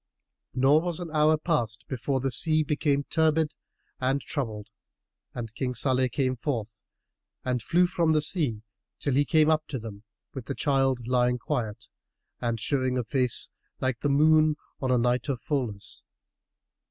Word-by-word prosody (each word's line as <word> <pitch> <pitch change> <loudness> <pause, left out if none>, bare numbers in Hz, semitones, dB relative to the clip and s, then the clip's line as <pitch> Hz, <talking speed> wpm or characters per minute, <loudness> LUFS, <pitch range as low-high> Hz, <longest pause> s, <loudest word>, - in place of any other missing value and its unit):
Nor 135 +4 +4
was 175 -1 -3
an 170 -3 -6
hour 155 0 +4
past 120 -9 -1
before 130 +1 -2
the 135 0 -1
sea 155 +5 +3
became 145 -1 0
turbid 160 0 +1 0.5
and 130 +2 +1
troubled 115 -6 -4 0.7
and 115 -3 -5
King 125 +1 -3
Salih 130 -1 +2
came 130 +1 0
forth 110 -5 -4 0.6
and 125 -1 0
flew 175 +9 +3
from 170 -2 +1
the 155 -1 +3
sea 140 - 0 0.3
till 140 - -1
he 145 +2 +3
came 155 0 +4
up 155 -1 +1
to 135 - -4
them 110 -3 -8 0.3
with 130 -4 -7
the 140 - -4
child 135 -2 +1
lying 125 0 +2
quiet 115 -4 -3 0.5
and 115 -2 -2
showing 130 +1 0
a 125 - 0
face 125 +1 +1 0.3
like 130 -3 -1
the 145 - 0
moon 155 +2 +4 0.3
on 130 - -1
the 125 - +4
night 125 +3 +1
of 130 -3 -1
fulness. 115 -8 -4
130 Hz, 160 wpm, -27 LUFS, 120-150 Hz, 0.7 s, Nor